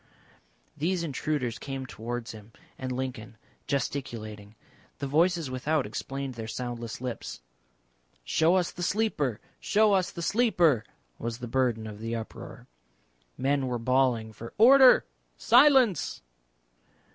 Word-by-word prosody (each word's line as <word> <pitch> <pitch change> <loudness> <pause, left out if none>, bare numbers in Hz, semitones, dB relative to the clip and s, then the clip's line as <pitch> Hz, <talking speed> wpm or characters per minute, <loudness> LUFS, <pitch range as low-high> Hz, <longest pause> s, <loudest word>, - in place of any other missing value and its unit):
These 170 +4 -1
intruders 140 -5 -2
came 135 -1 -5
towards 120 0 -5
him 110 0 -13 0.3
and 130 -1 -4
Lincoln 125 -3 -5 0.3
gesticulating. 110 -7 -4 0.4
The 140 - -4
voices 165 +1 +1
without 140 +3 0
explained 135 +5 -5
their 115 -2 -7
soundless 120 0 -5
lips. 125 - -6 0.8
"Show 160 - +3
us 180 -2 +1
the 175 - -9
Sleeper, 170 - 0 0.2
show 215 0 +3
us 185 -2 +2
the 170 - -7
Sleeper!" 175 - +3 0.4
was 115 0 -4
the 120 0 -7
burden 120 -3 0
of 105 -1 -8
the 115 +1 -3
uproar. 115 -1 -8 0.7
Men 135 0 0
were 125 -1 -1
bawling 120 -2 +1
for 115 +2 -10
"Order! 260 +4 +7 0.3
Silence!" 250 - +4
130 Hz, 120 wpm, -28 LUFS, 115-170 Hz, 0.8 s, Order